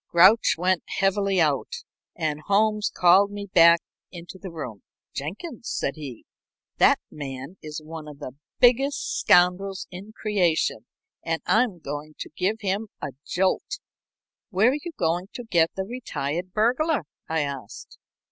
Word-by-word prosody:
Grouch 190 +6 +6
went 180 +1 +1 0.2
heavily 195 -1 +2
out, 170 - 0 0.3
and 155 -3 -2
Holmes 210 +1 +2
called 190 +3 +5
me 205 0 -6
back 170 -2 +7 0.3
into 175 +1 -10
the 190 - -7
room. 140 - -7 0.3
"Jenkins," 225 - -6
said 140 - -1
he, 140 -7 -9 0.5
"that - - +6
man 135 +4 -7
is 155 0 -7
one 160 0 -8
of 150 -1 -10
the 140 -3 -7 0.3
biggest 270 +3 +3
scoundrels 185 +2 +3
in 190 +4 -9
creation, 180 - 0 0.4
and 165 0 -2
I'm 225 -4 +2
going 150 0 -7
to - - -7
give 215 +4 -1
him 200 +2 -1
a 145 - -4 0.2
jolt." 190 - 0 0.7
"Where 215 +5 +4
are 290 - -2
you 345 - -5
going 175 +2 0
to 245 - -5
get 170 -7 +3
the 190 - -2
retired 185 - -4
burglar?" 245 - +1 0.3
I 160 -1 +1
asked. 140 -7 -7
180 Hz, 145 wpm, -25 LUFS, 155-210 Hz, 0.7 s, back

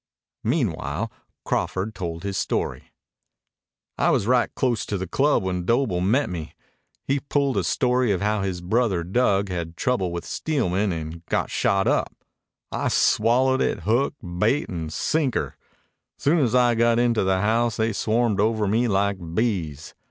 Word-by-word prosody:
Meanwhile 110 - -1 0.3
Crawford 95 +4 -1
told 85 -3 -5
his 100 -1 -3
story. - - -2 1.1
"I - - +3
was - - +2
right 125 +1 +3
close 120 -4 0
to 100 - -2
the 95 - -3
club 140 - +2
when 90 -1 -2
Doble 110 -3 +1
met 115 +10 +2
me. 85 -4 -6 0.5
He 140 +1 0
pulled 140 -1 0
a - - +1
story 125 -2 +1
of 95 - 0
how 105 0 0
his 95 -2 -3
brother 95 -1 +1
Dug 100 0 +1
had 90 - -3
had 85 0 -6
trouble 115 -9 0
with 85 0 -5
Steelman 105 - -1
and 80 0 -6
got - - -1
shot 95 0 +1
up. - - 0 0.6
I - - -1
swallowed 130 +4 +3
it - - 0
hook, 120 +7 +1 0.2
bait, 115 +9 +2
and 80 -3 -4
sinker. 150 - -1 0.6
Soon 160 +4 +2
as 125 -4 +2
I 120 -1 +4
got 115 0 +3
into 120 -3 +2
the 95 0 +1
house 115 +2 +1
they 110 0 0
swarmed 110 +1 +1
over 110 0 +2
me 115 +5 +2
like 100 -1 +1 0.2
bees. 90 - -2
110 Hz, 160 wpm, -24 LUFS, 95-120 Hz, 1.1 s, I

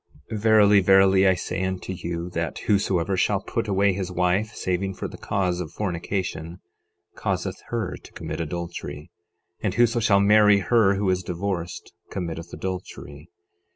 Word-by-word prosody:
12:32 110 - -2
Verily, 105 -2 +6
verily, 95 0 +5
I 95 - +4
say 95 - -3
unto 95 0 -3
you, 85 0 -5
that 85 -1 -3
whosoever 95 -3 +1
shall 95 +2 +2
put 115 +3 -3
away 100 0 +2
his 95 -1 -4
wife, 90 +4 +1
saving 95 +1 -2
for - - -4
the - - -10
cause 90 -3 -1
of 80 - -6
fornication, 90 -3 -3 0.5
causeth - - -3
her 115 -5 -3
to - - -16
commit - - -5
adultery; 80 -2 -6 0.5
and 100 -3 -1
whoso 120 0 +3
shall 105 -3 +4
marry 105 0 +6
her 100 0 +3
who 100 0 -1
is 90 0 0
divorced 90 -1 -4 0.2
committeth 85 -2 -5
adultery. 90 -5 -7
95 Hz, 155 wpm, -24 LUFS, 90-100 Hz, 0.5 s, Verily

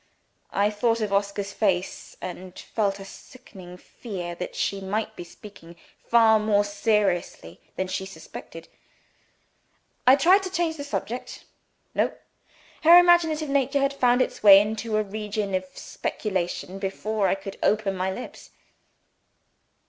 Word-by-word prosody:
I 205 +1 +1
thought 225 +2 0
of 210 -2 -2
Oscar's 200 0 -1
face, 190 -4 -2
and 185 0 -8
felt 200 -3 -2
a 195 - -9
sickening 190 -5 -13
fear 180 -3 -7
that 180 +1 -7
she 200 -1 -2
might 205 +3 -3
be - - -7
speaking 175 -2 -14 0.3
far 225 -2 +5
more 210 -1 +2
seriously 205 - -1
than 185 - -2
she 190 +1 -4
suspected. 195 - -11 1.4
I 260 - +9
tried 365 +7 +5
to 380 - -5
change 340 -3 -1
the 285 - -5
subject. 255 -3 -5 0.5
No! - - 0 0.7
Her 335 +2 +8
imaginative 335 -4 +4
nature 275 0 +1
had 275 0 +1
found 250 -2 +3
its - - -7
way 200 -2 +9
into 215 +1 -2
a 215 - +1
new 200 - -15
region 210 -1 -3
of 185 0 -1
speculation 190 -1 -4
before 200 +1 -1
I 185 - +2
could 195 0 -9
open 210 -2 +1
my 185 +1 -1
lips. 245 +6 -9
210 Hz, 140 wpm, -25 LUFS, 195-245 Hz, 1.4 s, I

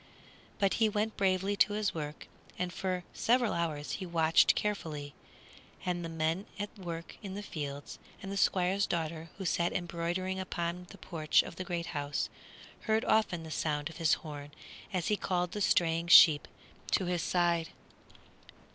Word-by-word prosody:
But 195 -1 +2
he 220 - +5
went 215 +1 -1
bravely 195 0 +1
to 205 - +4
his 210 -1 0
work, 150 -1 -6 0.3
and 180 -1 -2
for 185 -1 -2
several 240 -1 +2
hours 155 -3 -2
he 190 - -3
watched 165 -1 +4
carefully; 155 -9 -3 0.7
and 175 -1 -1
the 165 - -4
men 165 +4 -1
at 205 +1 -5
work 170 -4 -7
in 195 -3 -6
the 205 - -5
fields, 145 -6 -6 0.2
and 195 - -7
the - - -3
Squire's 190 +1 +2
daughter, 165 -1 -3
who 195 - -5
sat 170 0 +1
embroidering 175 +2 -2
upon 180 -1 -3
the - - -12
porch 155 -4 +2
of - - -9
the 185 - -3
great 175 -1 -3
house, 145 -1 -2 0.6
heard 220 0 +2
often 200 -6 +2
the 160 - -8
sound 150 0 -1
of 160 - -12
his 165 -2 +3
horn 145 -1 -7 0.4
as 180 -3 -1
he 210 - +3
called 180 -3 -1
the 210 - -4
straying 170 -3 +2
sheep 160 -6 +8 0.5
to 185 - +3
his 175 -1 0
side. 170 0 +1
175 Hz, 165 wpm, -31 LUFS, 160-190 Hz, 0.7 s, sheep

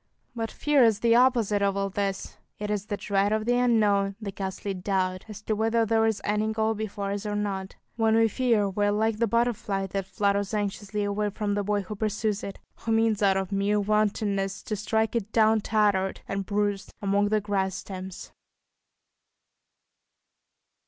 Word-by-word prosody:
But 225 -1 -2
fear 290 +1 +3
is 220 -2 +3
the 230 -1 +4
opposite 235 -5 +3
of 200 -1 +1
all 195 0 -1
this; 195 -1 -3 0.2
it 210 0 -4
is 210 -1 -2
the 205 - -2
dread 200 0 +1
of 215 0 0
the 245 - +2
unknown, 205 -5 +2
the 210 -3 -5
ghastly 195 +1 -4
doubt 185 0 -1
as 210 0 -9
to 215 - -1
whether 225 +1 +2
there 225 0 +2
is 220 -2 0
any 210 +1 0
goal 220 0 +1
before 205 -2 -4
us 200 0 -3
or 210 -1 -3
not; 195 -2 -3 0.2
when 225 -1 +3
we 225 0 +5
fear, 230 -3 +1
we 205 +1 0
are - - +2
like 215 +1 +1
the 230 - +2
butterfly 215 -4 0
that 195 0 -4
flutters 200 +1 0
anxiously 205 0 -2
away 205 +1 -1
from 205 0 -2
the 205 0 0
boy 205 0 0
who 210 +3 -6
pursues 210 0 -1
it, 200 - -6 0.2
who 225 - -4
means 225 -1 +2
out 195 -1 +4
of 195 +1 -3
mere 200 +1 +1
wantonness 205 -2 0
to 215 - -3
strike 220 +2 0
it 215 -2 -2
down 220 -1 +4
tattered 200 -3 +1
and 195 -1 -3
bruised 205 -1 -1
among 200 0 +1
the 215 0 +2
grass 195 -2 -1
stems. 190 -1 -7
205 Hz, 185 wpm, -26 LUFS, 195-220 Hz, 0.2 s, we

